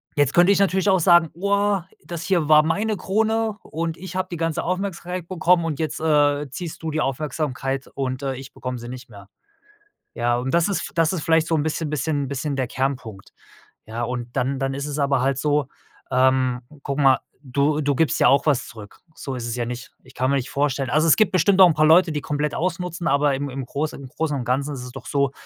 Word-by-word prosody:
jetzt 145 -2 +2
könnte 175 +3 +6
ich 200 - +3
natürlich 190 0 +2
auch 190 -1 +4
sagen: 170 -1 +5
„Oah, 200 +1 0 0.2
das 170 -2 -6
hier 175 -5 +1
war 155 0 +8
meine 210 +7 0
Krone 220 +2 0
und 165 +1 -4
ich 185 +2 -9
habe 185 0 -1
die 170 - -4
ganze 165 -1 -1
Aufmerksamkeit 180 -1 -3
bekommen 175 -1 +2
und 155 -4 -3
jetzt, 160 -1 -2
äh, 145 -2 +2
ziehst 165 +2 -7
du 160 - -2
die 155 0 -1
Aufmerksamkeit 135 -1 -2
und, 130 -1 -3
äh, 135 -1 -2
ich 135 +1 -10
bekomme 125 -1 -5
sie 120 +1 -8
nicht 125 0 -9
mehr.“ 100 -2 -14 0.8
Ja, 120 0 0
und 130 +2 -3
das 170 -1 +3
ist 200 - -2
das 165 +1 +2
ist 175 - -2
vielleicht 160 0 +3
so 165 - +1
'n 150 - +1
bisschen 160 0 -2
bisschen 145 -1 -1
bisschen 140 +2 -3
der 130 -2 0
Kernpunkt. 125 -7 -4 0.6
Ja, 115 +2 -4
und 120 0 -5
dann 135 +2 0
dann 135 0 -1
ist 140 +1 -4
es 145 0 -4
aber 140 -2 +2
halt 135 -1 +1
so, 150 -1 +1 0.5
ähm, 130 -1 +2 0.2
guck 140 0 -3
mal, 135 -2 +5 0.3
du 140 +4 +1
du 145 0 +1
gibst 160 +3 +1
ja - - +6
auch 140 - +3
was 145 -5 +2
zurück. 105 -3 -12
So 135 -4 -6
ist 120 - -5
es 115 - -3
ja 120 -1 -2
nicht. 120 +1 -7
Ich 130 +1 -18
kann 130 +1 0
mir 140 - +2
nicht 130 -1 -2
vorstellen 140 -2 0
also, 155 +4 +3
es 155 - +6
gibt 215 -3 +3
bestimmt 185 +2 +3
noch 190 - +10
'n 160 - +1
paar 155 - +3
Leute, 165 +1 +5
die 150 - -2
komplett 150 0 -2
ausnutzen, 175 -1 -2
aber 140 0 +2
im 140 +1 -3
im 130 -1 -5
Großen 145 +3 -3
im 135 - -9
Großen 150 +2 -2
und 125 - -4
Ganzen 140 +4 0
ist 125 - -7
es 125 - -9
doch 135 - -10
so, 140 -2 0
145 Hz, 235 wpm, -22 LUFS, 130-170 Hz, 0.8 s, noch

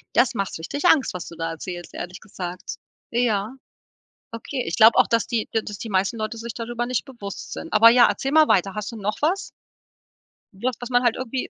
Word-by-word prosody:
Das 245 - +4
macht 195 -4 -3
richtig 285 - -4
Angst, 315 -6 +4
was 180 - -6
du 170 - -10
da 165 0 -3
erzählst, 175 +2 -7
ehrlich 180 +1 -7
gesagt. 180 -2 -7 0.4
Ja. 230 -2 0 0.8
Okay, 240 +3 -4
ich 165 - -1
glaube 220 +1 +7
auch, - - +5
dass 230 0 +1
die 230 -3 -2
dass 210 -2 -2
die 230 - -6
meisten 195 +3 0
Leute 215 +1 -4
sich 230 0 -6
darüber 240 +1 -3
nicht 250 -1 -1
bewusst 235 -8 -8
sind. - - -7
Aber 220 +2 +8
ja, 240 +1 +6
erzähl 270 - -2
mal 310 0 +6
weiter. 195 0 +2
Hast 210 +1 -4
du - - -9
noch 210 0 -2
was? 350 +6 0 1.0
Was, 240 +6 -2
was 245 - -5
man 245 0 +3
halt 240 -2 +3
irgendwie 255 0 -4
225 Hz, 210 wpm, -23 LUFS, 195-245 Hz, 1.0 s, Aber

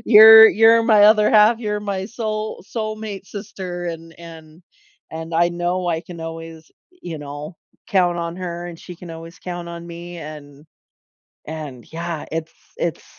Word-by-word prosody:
you're 220 0 +10
you're 225 +2 +5
my 215 -3 +5
other 210 0 +5
half, 215 +1 +5
you're 210 -3 -2
my 195 -2 -3
soul 215 -3 -4
soulmate 215 -3 -4
sister," 190 -4 -7
and 165 -1 -7
and 165 0 -13 0.5
and 160 +1 -7
I 170 +1 +3
know 175 +1 -2
I 165 -1 0
can 175 -1 -11
always, 165 0 -8 0.2
eh, - - -28
you 165 -3 -6
know, 145 +3 -8 0.3
count 175 -3 +2
on 170 0 -4
her, 175 -1 -5
and 170 -2 -9
she 180 - -11
can 175 -1 -11
always 165 +1 -10
count 175 -1 -6
on 170 0 -8
me, 170 +1 -9
and 150 -2 -10 0.8
and 150 -6 -8
yeah 165 -1 -4
it's 160 0 -4 0.2
it's - - -3
175 Hz, 165 wpm, -20 LUFS, 165-210 Hz, 0.8 s, you're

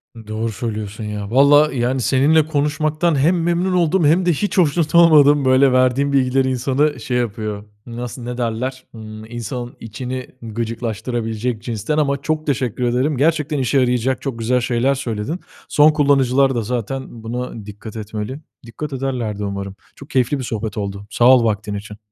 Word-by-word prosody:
I 110 -2 -12
doğru 110 +1 -3
söylüyorsun 105 -1 -5
ya. 105 -1 -5
Valla 145 +4 +5
yani, 130 +1 0
seninle 145 +5 +3
konuşmaktan 155 +2 0
hem 170 +4 +2
memnun 175 +2 0
oldum 175 -1 +2
hem 170 +5 +3
de 175 - +3
hiç 205 +7 -2
hoşnut 165 -1 +2
olmadım. 150 -4 +6
Böyle, 130 +1 +5
verdiğin 130 +2 +2
bilgiler 130 0 +2
insanı 135 +3 0
şey 125 +2 -2
yapıyor. 110 -3 -3 0.2
Nasıl, 120 +1 -7
ne 120 0 -5
derler? 125 +2 -3
Imm, 110 -1 -9
insanın 120 +2 -6
içini 125 +3 -6
gıcıklaştırabilecek 115 0 -3
cinsten 115 +4 -2
ama 140 -2 +1
çok 155 +2 -2
teşekkür 130 -4 -1
ederim. 125 +4 +1
Gerçekten 150 +1 +1
işe 130 +1 +2
yarayacak, 125 0 +1
çok 130 -5 -4
güzel 125 +3 +1
şeyler 120 +3 +1
söyledin. 120 - -4 0.3
Son 150 +1 +5
kullanıcılar 135 -3 +3
da 120 - 0
zaten 120 +1 -4
buna 115 -2 -5
dikkat 105 +1 -10
etmeli. 110 +5 -5 0.3
Dikkat 140 +6 -7
ederler 125 -6 -3
de 105 - -2
umarım. 100 -1 -5 0.2
Çok 140 - -13
keyifli 130 0 +1
bir - - -4
sohbet 110 -2 -4
oldu. 100 0 -5
Sağ 120 - +3
ol 125 - +3
vaktin 105 -2 -1
için. 105 +1 -8
125 Hz, 165 wpm, -19 LUFS, 115-140 Hz, 0.3 s, olmadım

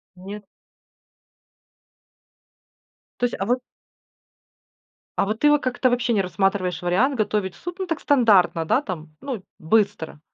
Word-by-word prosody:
Нет? 200 +3 -9 2.8
То 245 - +3
есть, 240 - -2
а 195 - -1
вот 245 +3 +1 1.6
а - - +3
вот 215 +2 -2
ты 295 0 +5
во 295 - +4
как-то 255 0 +1
вообще 240 -1 +1
не 200 - +3
рассматриваешь 185 -2 0
вариант 220 +11 +2
готовить 205 -4 -1
суп, 350 - -7
ну 375 - -1
так, 330 -3 -2
стандартно, 205 - +4
да, 260 - +2
там, 160 - -7
ну, 250 -9 -5 0.2
быстро? 200 -4 0
210 Hz, 135 wpm, -23 LUFS, 185-250 Hz, 2.8 s, ты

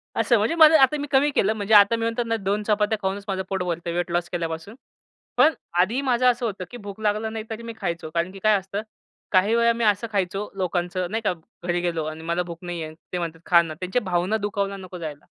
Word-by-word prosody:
असं 235 - +3
म्हणजे 215 +10 +1
मला 315 -2 +7
आता 265 +3 +5
मी 290 - -4
कमी 280 +2 +4
केलं 215 +3 +3
म्हणजे 215 0 -1
आता 205 +2 +7
मी 225 - -4
म्हणतो 230 +1 0
ना 230 0 -1
2 200 +1 -1
चपात्या 210 +1 +1
खाऊनच 195 +1 -2
माझं 190 -1 -2
पोट 190 -2 -1
भरत 170 -1 -3
वेट 175 0 -2
लॉस 175 0 -1
केल्यापासून. 165 +4 -4 0.6
पण 315 - +6 0.3
आधी 225 +9 +2
माझं 255 -2 +1
असं 240 0 -4
होतं 195 -4 -3
की 245 - -7
भूक 205 -2 -9
लागला 215 +1 0
नाही 220 0 -5
तरी 225 +1 -6
मी 230 0 -6
खायचो. 170 -4 -3
कारण 170 +2 0
की 195 - -11
काय 215 +2 +4
असतं, 195 +2 -5 0.5
काही 200 +4 +4
वेळा 235 0 +4
मी 235 - -2
असं 210 +1 +2
खायचो 195 0 -1
लोकांचं 180 0 -1
नाही 225 +1 -1
का - - +2 0.3
घरी 175 0 +1
गेलो 170 -2 -1
आणि 155 +1 -6
मला 170 +2 0
भूक 170 -1 -8
नाहीये. 165 -3 -5 0.2
ते 180 - 0
म्हणतात, 165 -1 -4
"खा 170 -1 +6
ना" 165 -2 -5
त्यांच्या 190 +7 -1
भावना 185 +2 0
दुखावला 200 -1 -2
नको 185 -1 -9
जायला. 155 -4 -7
195 Hz, 235 wpm, -24 LUFS, 175-220 Hz, 0.6 s, मला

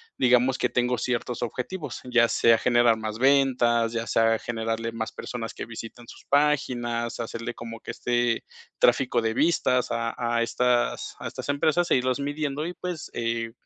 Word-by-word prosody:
digamos 125 +1 +3
que 125 - +1
tengo 125 0 +1
ciertos 125 -1 -2
objetivos, 130 +4 -4
ya 120 -2 +3
sea 115 -1 +4
generar 120 -2 +4
más 110 -1 -4
ventas, 125 -3 +3
ya 115 0 -2
sea 115 0 +3
generarle 115 0 -3
más 110 -1 -4
personas 115 -2 -6
que - - -5
visitan 115 +1 -9
sus - - -13
páginas, 120 -5 0
hacerle 115 +1 -4
como 115 -1 -8
que - - -6
este 120 0 0 0.4
tráfico 125 -2 +3
de 110 0 0
vistas 130 -6 +2
a 115 0 -1
a 120 -1 0
estas 125 0 0
a - - -5
estas - - -7
empresas 155 +4 +1
e - - +6
irlos 130 +1 0
midiendo 145 +1 -2
y, 175 - -5
pues, 180 -3 -6
eh, 115 -1 -2
120 Hz, 165 wpm, -26 LUFS, 115-130 Hz, 0.4 s, e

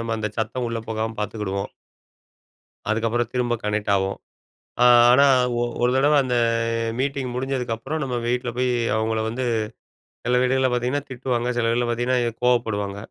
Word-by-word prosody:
நம்ம 115 0 -2
அந்த 110 -1 -2
சத்தம் 120 +2 -2
உள்ளே 115 -1 -4
போகாம 110 0 -2
பார்த்துக்கிடுவோம். 100 -2 -3 1.2
அதுக்கப்புறம் 115 +2 0
திரும்ப 125 -1 0
கனெக்ட் 105 0 -1
ஆவோம். 95 0 -2 0.7
ஆ - - +6 0.3
ஆனா, 140 +3 +6 0.4
ஒ - - +2 0.2
ஒரு 125 - +3
தடவ 145 +3 +3
அந்த 125 -1 -1 0.7
மீட்டிங் 135 -2 -2
முடிஞ்சதுக்கப்புறம், 130 +2 -3
நம்ம 125 -2 -3
வீட்ல 125 0 -1
போய் 125 0 +1 0.3
அவங்கள 110 0 0
வந்து 125 +3 -3 0.8
சில 125 +1 +3
வீடுகள்ல 130 +1 +2
பார்த்தீங்கன்னா 125 +4 -1
திட்டுவாங்க. 125 -1 -2
சில 115 -1 +1
வீல 120 +1 +1
பார்த்தீங்கன்னா 120 +2 +1 0.3
கோவப்படுவாங்க. 105 -5 0
120 Hz, 140 wpm, -23 LUFS, 110-130 Hz, 1.2 s, ஆ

